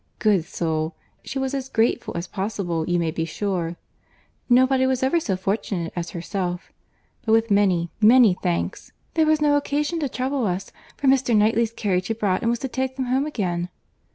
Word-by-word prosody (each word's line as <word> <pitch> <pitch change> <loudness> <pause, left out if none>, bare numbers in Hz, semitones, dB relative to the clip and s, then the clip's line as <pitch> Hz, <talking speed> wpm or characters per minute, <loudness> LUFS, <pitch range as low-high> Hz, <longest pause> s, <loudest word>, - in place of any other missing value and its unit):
Good 200 -7 +2
soul! 160 -2 -2 0.3
she 270 - -5
was 265 0 -1
as 270 -1 -3
grateful 225 -6 0
as 170 - -3
possible, 190 -5 -3
you 175 - +2
may 165 -2 0
be 165 0 -2
sure. 175 0 -2 0.7
'Nobody 260 +1 +4
was 260 -1 0
ever 270 +6 +3
so 195 - -2
fortunate 190 -3 -2
as 175 -1 -3
herself!'—but 180 +4 -6
with 225 0 +3
many, 185 -4 +2
many 225 -1 +7
thanks—'there 190 - -2
was 310 -1 +3
no 290 -1 +4
occasion 295 +3 -1
to 290 -4 -1
trouble 260 -1 -1
us, 185 +2 -3 0.3
for 280 - -1
Mr. 260 -4 +4
Knightley's 220 +2 +3
carriage 185 -5 -1
had 225 - -2
brought, 195 -4 0
and 230 - +1
was 235 - +1
to 270 - -2
take 260 0 -3
them 260 -1 -2
home 260 +4 +1
again. 180 - -2
215 Hz, 180 wpm, -23 LUFS, 180-260 Hz, 0.7 s, many